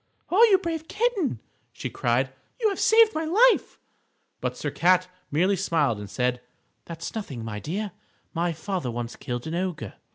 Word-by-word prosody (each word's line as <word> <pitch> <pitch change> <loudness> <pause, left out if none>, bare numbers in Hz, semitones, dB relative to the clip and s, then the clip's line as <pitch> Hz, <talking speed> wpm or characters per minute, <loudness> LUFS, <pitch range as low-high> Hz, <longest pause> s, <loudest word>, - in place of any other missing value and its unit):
"Oh, 405 +6 +6
you 390 - +7
brave 330 -3 -4
kitten!" 430 - 0 0.3
she - - -5
cried, - - 0 0.3
"you 445 -3 +3
have 395 - -3
saved 450 -1 +6
my 315 - -1
life!" 440 +10 +4 0.6
But - - -3
Sir - - -3
Cat 185 +1 +3 0.2
merely 180 +7 +2
smiled 160 - +1
and 105 -1 -7
said: 125 +2 0 0.4
"That's 165 0 -6
nothing, 135 - -5
my 105 -2 -4
dear; 195 - -3 0.4
my 170 +1 0
father 165 -3 -3
once 120 0 -4
killed 120 -1 -5
an 160 - -4
ogre!" 170 - -3
185 Hz, 165 wpm, -26 LUFS, -, 0.6 s, you